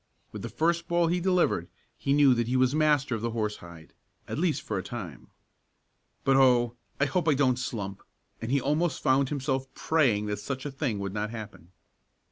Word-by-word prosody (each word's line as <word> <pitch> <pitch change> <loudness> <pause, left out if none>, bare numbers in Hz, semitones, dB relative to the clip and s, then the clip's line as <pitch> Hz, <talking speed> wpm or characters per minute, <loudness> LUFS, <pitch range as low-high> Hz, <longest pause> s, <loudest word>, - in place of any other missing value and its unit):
With - - -7
the - - -5
first 170 +1 0
ball 170 0 +2
he 175 +1 +1
delivered 180 - +1 0.3
he 140 - -2
knew 140 -2 +6
that 120 -1 0
he 130 +2 +1
was 130 +1 +3
master 150 -4 +2
of 110 - -2
the 115 - -1
horsehide 105 -8 -5 0.3
at - - -4
least 170 -2 0
for 100 -3 -2
a - - -5
time. 100 -11 -7 1.0
"But 135 0 +4
oh! 120 -3 +4 0.2
I 145 - +4
hope 165 +4 -1
I 150 - +4
don't 130 -3 +2
slump!" 100 -6 -4 0.4
and 115 +2 -3
he 140 - +3
almost 150 +3 0
found 130 0 +3
himself 135 -2 -2
praying 125 -10 +2
that 105 -1 -3
such 130 +5 -5
a 145 - -3
thing 135 -5 -2
would 100 -1 -4
not 105 0 -2
happen. 105 -6 -9
130 Hz, 195 wpm, -28 LUFS, 110-145 Hz, 1.0 s, knew